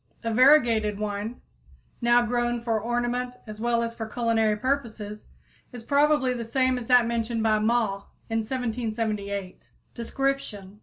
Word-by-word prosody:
A 230 -1 -1
variegated 235 -5 +5
one, 210 +3 -4 0.6
now 240 0 +4
grown 240 0 0
for 225 -2 0
ornament 245 +2 -1
as 215 -1 -9
well 235 0 +1
as 230 0 -3
for 225 -1 -6
culinary 225 -2 +1
purposes, 220 -5 -3 0.4
is 245 -3 -9
probably 280 -1 +3
the 240 -1 -4
same 255 +2 +1
as 235 - -8
that 245 -2 +6
mentioned 230 -1 -1
by 215 -1 +3
Mawe 215 -3 0 0.2
in 225 0 0
1778. 220 -5 -3 0.2
_Description. 230 -6 -3
230 Hz, 140 wpm, -26 LUFS, 215-245 Hz, 0.6 s, that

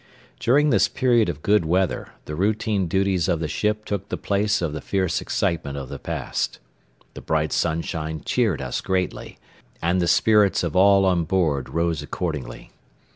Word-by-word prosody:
During 145 +5 +3
this - - +4
period 120 -6 +2
of 75 -3 -6
good 105 -2 +3
weather 90 +3 -1
the 75 - -6
routine 100 +2 0
duties 95 -1 +1
of 85 -4 +1
the 80 - -2
ship 105 +6 -1
took 100 -1 -4
the - - -3
place 105 +1 0
of 85 -4 -2
the 75 - -5
fierce 95 -2 -1
excitement 75 -4 -2
of 65 -2 -6
the - - -7
past. - - -3 0.6
The - - -9
bright 80 -1 0
sunshine 80 -1 -2
cheered 110 - 0
us 65 - -3
greatly, 95 -1 -3 0.4
and 90 +2 +1
the 85 - +1
spirits 105 +2 +4
of 85 -1 -3
all 100 +1 +5
on 90 -3 +2
board 80 -7 0
rose 85 -2 -1
accordingly. 75 -1 -5
90 Hz, 170 wpm, -23 LUFS, 80-100 Hz, 0.6 s, all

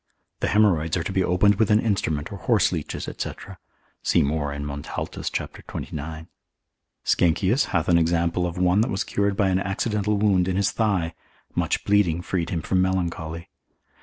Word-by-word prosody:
The - - 0
haemorrhoids 90 -6 +3
are 85 - -1
to 90 - -4
be 95 -1 +2
opened 90 +3 +3
with 110 -1 +3
an 105 0 +5
instrument 85 -9 -1
or 100 - -7
horseleeches, - - 0
&c. - - -4 0.7
See - - +3
more 75 0 -1
in 70 0 -5
Montaltus, 70 0 -4
cap. - - -4
29. 80 +2 -6 0.8
Sckenkius 95 - +2
hath 90 -5 -1
an 85 -1 +5
example 85 +1 +1
of 85 - -6
one 90 +3 +3
that 115 - +1
was 95 - -1
cured 100 -1 -1
by 100 -2 +3
an 95 0 +2
accidental 105 +1 -1
wound 100 -3 +3
in 95 - 0
his 100 0 +2
thigh, 95 -7 0 0.4
much - - 0
bleeding 90 -5 +2
freed 85 -3 -2
him 85 -3 -2
from 95 -1 +1
melancholy. 85 -3 -2
90 Hz, 170 wpm, -24 LUFS, 80-100 Hz, 0.8 s, an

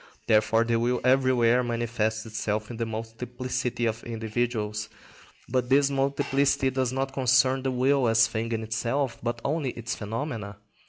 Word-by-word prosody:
Therefore 110 +1 +3
the 115 0 +1
will 120 +1 +1
everywhere 125 -2 +4
manifests 115 -2 -1
itself 105 0 -3
in 115 - -7
the 115 0 -2
multiplicity 120 +2 -3
of 110 0 -2
individuals. 110 -2 -2 0.6
But 125 0 -1
this 140 +1 +4
multiplicity 140 0 +1
does 130 -1 0
not 135 +1 -2
concern 130 0 +3
the 135 - -1
will 130 +1 +2
as 115 0 +5
thing 115 0 -3
in 110 -1 -1
itself, 115 +4 -1
but 120 0 -2
only 145 -1 0
its 120 +2 -4
phenomena. 110 -2 -5
120 Hz, 150 wpm, -27 LUFS, 115-130 Hz, 0.6 s, as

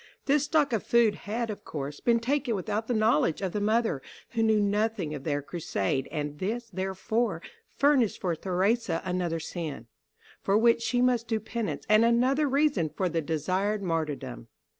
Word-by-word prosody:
This 290 0 +3
stock 295 -4 +2
of 220 - +1
food 235 -3 +3
had, 220 +3 -3
of 205 - -8
course, 145 -1 -5
been 235 -1 +3
taken 255 0 0
without 210 +3 -2
the 245 - 0
knowledge 215 -8 +2
of 190 -2 -2
the 210 - -2
mother, 215 - +1 0.3
who 230 - -1
knew 220 -1 +4
nothing 205 -5 0
of 140 -2 -7
their 145 -2 -1
crusade, 135 - -2
and 150 -1 -4
this, 230 +4 -3
therefore, 190 +5 -1 0.4
furnished 275 -7 +3
for 175 -3 -1
Theresa 190 +2 0
another 180 -2 -1
sin, 160 -7 -5 0.6
for 195 +1 +2
which 230 +1 +4
she 245 +1 +1
must 245 -2 +2
do 225 -1 0
penance, 220 +1 -4
and 215 +1 +5
another 255 +5 +3
reason 270 - +2
for 185 +4 -1
the 165 0 -1
desired 185 +7 -1
martyrdom. 155 - -3
210 Hz, 170 wpm, -28 LUFS, 170-235 Hz, 0.6 s, and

